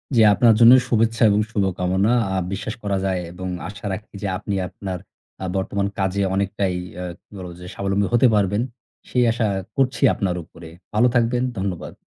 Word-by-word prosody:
জি। 115 - +6
আপনার 115 +2 +5
জন্য 120 +1 +9
শুভেচ্ছা 115 0 +2
এবং 105 0 +3
শুভকামনা। 95 0 +1 0.2
আ - - 0 0.2
বিশ্বাস 105 +3 -4
করা 100 -1 0
যায় 95 -1 0
এবং 95 +1 -6 0.2
আশা 100 +2 -9
রাখি 105 +3 -8
যে 100 - -2
আপনি 100 - -4
আপনার 95 -1 -6 0.4
আ - - -2
বর্তমান 100 +1 -1
কাজে 95 +1 0
অনেকটাই 100 -1 -1 0.3
আ - - -4 0.2
কি - - -66
বলব 90 -1 -7
যে - - -9
স্বাবলম্বী 100 0 0
হতে 120 +2 +5
পারবেন। 100 +1 +1 0.5
সেই 125 - +2
আশা 115 -1 0 0.3
করছি 130 -3 0
আপনার 95 -3 -1
উপরে। 85 0 -13 0.3
ভালো 110 +4 +4
থাকবেন। 120 +1 +2
ধন্যবাদ। 95 -2 -4
100 Hz, 175 wpm, -22 LUFS, 95-115 Hz, 0.5 s, জন্য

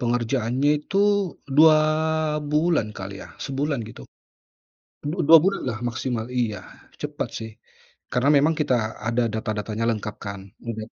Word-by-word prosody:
pengerjaannya 120 +2 +1
itu 195 - -1 0.6
2 155 0 +8 0.7
bulan 150 -8 +1
kali 100 0 -7
ya - - -13
sebulan 140 0 -2
gitu. 65 - -11 1.0
Du 150 +5 -3
dua 165 +1 +10
bulan 195 +1 +1
lah 110 -3 -3
maksimal. 120 -1 -2
Iya, 110 -4 0 0.4
cepat - - -3
sih, 110 0 -7 0.6
karena 125 +3 +2
memang 150 +3 +4
kita 130 -4 +2 0.3
ada 120 +2 +1
data-datanya 110 0 -3
lengkap 105 -1 -3
kan, 100 -1 -5 0.3
udah 110 -1 -4
120 Hz, 130 wpm, -24 LUFS, 110-145 Hz, 1.0 s, dua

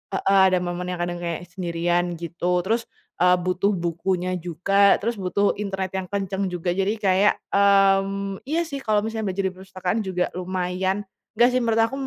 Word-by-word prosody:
heeh. 195 0 +3
Ada 185 - +4
momen 175 0 -3
yang 180 -1 -4
kadang 175 0 -2
kayak 170 0 -4
sendirian 175 -1 -1
gitu, 175 +2 -1
terus, 230 +3 0 0.4
eee, 180 0 +6
butuh 185 +2 +1
bukunya 180 +1 -1
juga, 195 +4 +3
terus 235 +3 0
butuh 195 +2 +1
internet 195 -2 -3
yang 185 - -9
kenceng 195 -1 -2
juga. 175 0 -2
Jadi 195 +3 0
kayak 195 +1 +4 0.2
mmm, 195 0 +3
iya 320 +4 +1
sih 280 -3 -5
kalau 215 -4 +1
misalnya 220 -2 -3
belajar 195 +1 -2
di - - -13
perpustakaan 185 +2 -3
juga 180 -1 0
lumaya 185 +1 -1 0.4
nggak 240 +2 +6
sih 255 - +3
menurut 225 -1 +2
aku 240 - -5
190 Hz, 175 wpm, -23 LUFS, 180-200 Hz, 0.4 s, eee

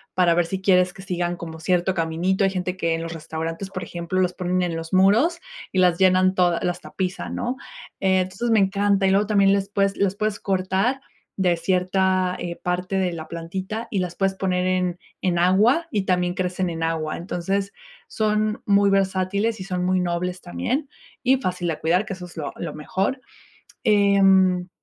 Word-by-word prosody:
para 175 -2 +4
ver 170 -1 +1
si 190 +1 -3
quieres 180 -2 +3
que 190 - -12
sigan 175 -1 -2
como 160 -1 -8
cierto 180 +2 +1
caminito. 170 +4 0
Hay 195 - +4
gente 180 -1 -3
que 165 -3 0
en 165 - -4
los 165 0 -5
restaurantes, 165 +3 -5
por 185 -2 -5
ejemplo, 175 +2 -3
los 180 -1 +1
ponen 180 0 -1
en 170 -2 -2
los 165 0 -6
muros 220 - +4 0.3
y - - -3
las 180 -2 +4
llenan 185 0 +4
todas 175 -2 +2
las 180 0 -2
tapizan, 185 0 -4
¿no? 250 +2 -2 0.4
Eh, 190 -1 +3
entonces 190 +6 -3
me 220 -2 +4
encanta. 200 0 +2
Y 190 - +3
luego 200 +1 +2
también 200 -2 +4
les 200 0 0
puedes 195 -1 0
las 195 -1 +1
puedes 215 0 -2
cortar 195 +7 0 0.4
de 180 -3 +2
cierta, 185 +1 +1
eh, 170 -1 -4
parte 180 +2 -2
de 185 -2 +1
la 160 -2 -7
plantita 190 +7 -5
y 200 - 0
las 180 -1 -3
puedes 195 0 0
poner 180 -1 0
en 180 -1 0 0.2
en 175 -2 +1
agua 210 - +4
y 205 -4 0
también 180 -1 +1
crecen 185 0 -1
en 165 -1 -5
agua. 160 -1 -1
Entonces 195 +3 -2 0.3
son 215 0 0
muy 200 0 +4
versátiles 195 +2 0
y 185 - -6
son 180 -1 -2
muy 185 0 +2
nobles 180 +1 -2
también 255 - -3 0.4
y 260 +1 +4
fácil 180 -8 -2
de 160 - -1
cuidar, 180 +6 +1
que 215 - -5
eso 185 -1 -9
es 175 -1 -14
lo 145 -3 -4
lo - - -5
mejor. 190 - -2 0.6
Em, 195 -4 +4
185 Hz, 195 wpm, -23 LUFS, 175-195 Hz, 0.6 s, para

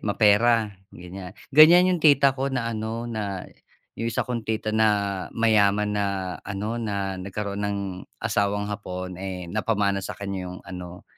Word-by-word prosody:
mapera 105 +2 +4 0.2
ganiyang-ganiyan 140 - +4
yung - - -7
tita 140 -3 +5
ko 135 +1 -1
na 125 -3 -1
ano 110 +2 -4
na 100 -5 -4 0.5
yung 115 +1 -2
isa - - 0
kong 120 -3 -4
tita 110 -1 -1
na 110 0 +4 0.5
mayaman, 105 -2 +3
na 100 - +1 0.4
ano 105 +3 -3
na 100 -3 -2
nagkaroon 100 +1 -4
ng 100 0 -1 0.4
asawang 100 0 0
hapon, 90 -3 -5
eh, 95 -2 -5
napamana 100 -1 0
sa - - -4
kaniya 100 -2 -4
yung 90 - -8
ano, 90 -2 -9
105 Hz, 145 wpm, -25 LUFS, 100-115 Hz, 0.5 s, tita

